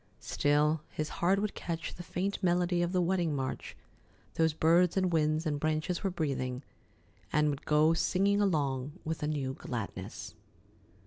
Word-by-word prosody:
Still 150 +2 +2
his 155 -1 -3
heart 185 +3 +4
would 210 0 -1
catch 165 -2 -4
the - - -9
faint 190 +3 -3
melody 175 -1 +2
of 175 0 0
the 180 -1 +2
wedding 175 -4 +1
march 130 -1 -4 0.6
those 160 0 +2
birds 165 +4 +3
and 185 -2 +2
winds 155 0 +2
and 150 -2 -1
branches 155 +4 -1
were 195 - +1
breathing, 135 -6 -2 0.7
and 150 0 +3
would 140 - -7
go 155 +2 +4
singing 200 +4 +2
along 145 -7 0
with 160 0 -3
a 150 - -1
new 140 -3 -2
gladness. 115 -6 -6
160 Hz, 155 wpm, -31 LUFS, 150-180 Hz, 0.7 s, heart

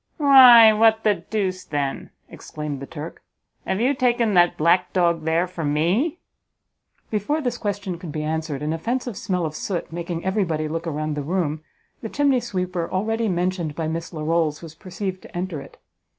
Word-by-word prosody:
"Why, 255 -7 +8
what 220 0 +3
the 210 - +4
deuce, 190 -3 -3
then," 140 -2 -3 0.2
exclaimed 150 -2 -7
the 140 - -8
Turk, 160 0 -8 0.5
"have 190 - -1
you 255 +5 +2
taken 240 -4 +1
that 175 -1 +4
black 175 +3 +2
dog 170 -3 +1
there 165 +2 +2
for 180 -2 -7
me?" 175 - +1 0.9
Before 215 +9 0
this 245 -4 -3
question 200 -4 -3
could 175 -4 -7
be 150 +1 -4
answered, 155 -2 -3
an 155 +1 -1
offensive 240 +7 -3
smell 185 -3 -2
of 155 - -4
soot, 175 -2 -4
making 170 0 -5
everybody 180 -6 0
look 165 +2 -4
around 155 -1 -2
the 145 - -3
room, 155 -1 -2 0.4
the 225 - -5
chimney 280 -1 +2
sweeper 185 -7 -3
already 225 +4 -1
mentioned 175 -3 -1
by 160 -2 -3
Miss 165 +1 -4
Larolles 160 -1 -1
was 160 -2 -9
perceived 185 +3 -6
to - - -10
enter 175 -5 -4
it. 140 - -14
180 Hz, 175 wpm, -23 LUFS, 160-215 Hz, 0.9 s, Why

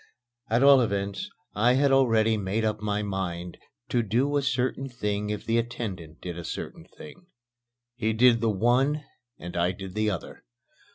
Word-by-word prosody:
At 115 +4 +3
all 140 -1 +8
events 100 - -2 0.2
I 120 +4 +3
had 140 +1 +3
already 115 -4 +4
made 105 +2 -1
up 105 -1 -1
my 105 0 -1
mind 90 -3 -4 0.3
to 120 - +2
do 125 +6 0
a 145 - +3
certain 130 +1 -1
thing 105 -3 -2
if 105 -1 -4
the 115 +1 +2
attendant 100 -9 -5
did 85 -1 -6
a - - -6
certain - - -6
thing. 175 - -12 0.7
He 110 -2 0
did 115 +1 +4
the 115 - +2
one 125 +8 +2 0.3
and 85 +1 -8
I 85 +1 +2
did 95 -2 -8
the 110 +1 +1
other. 95 -5 -6
110 Hz, 170 wpm, -27 LUFS, 100-125 Hz, 0.7 s, all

